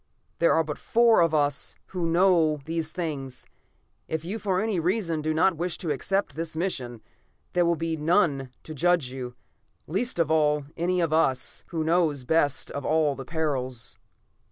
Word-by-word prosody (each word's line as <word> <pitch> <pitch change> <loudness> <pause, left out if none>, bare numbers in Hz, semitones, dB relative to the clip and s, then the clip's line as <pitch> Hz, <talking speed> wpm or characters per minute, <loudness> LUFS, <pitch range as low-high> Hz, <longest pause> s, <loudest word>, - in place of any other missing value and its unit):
There 170 - +4
are 160 - +3
but 150 -2 -5
four 230 -2 +4
of 165 -1 +3
us 145 -2 0
who 180 -3 -2
know 165 -3 +4
these 160 -1 -2
things. 145 -7 -5 0.6
If 160 0 -3
you 205 +6 -3
for 190 -4 0
any 215 -3 0
reason 170 -2 0
do 155 +1 -1
not 165 +2 +3
wish 175 0 -2
to 165 - -3
accept 195 +8 -1
this 160 0 -4
mission, 125 - -3 0.5
there 175 -1 +3
will 170 - +3
be 165 0 -2
none 150 -4 +2
to 155 - -8
judge 170 -3 +2
you, 125 -2 -6 0.5
least 205 - -2
of 165 -2 +1
all, 150 -2 +2
any 180 +2 0
one 175 - +2
of 160 -2 0
us, 135 -5 0
who 165 -2 -2
know 165 0 +3
best 145 -2 +1
of 140 - -5
all 155 -1 +2
the 135 - -8
perils." 130 - -3
160 Hz, 180 wpm, -26 LUFS, 145-175 Hz, 0.6 s, There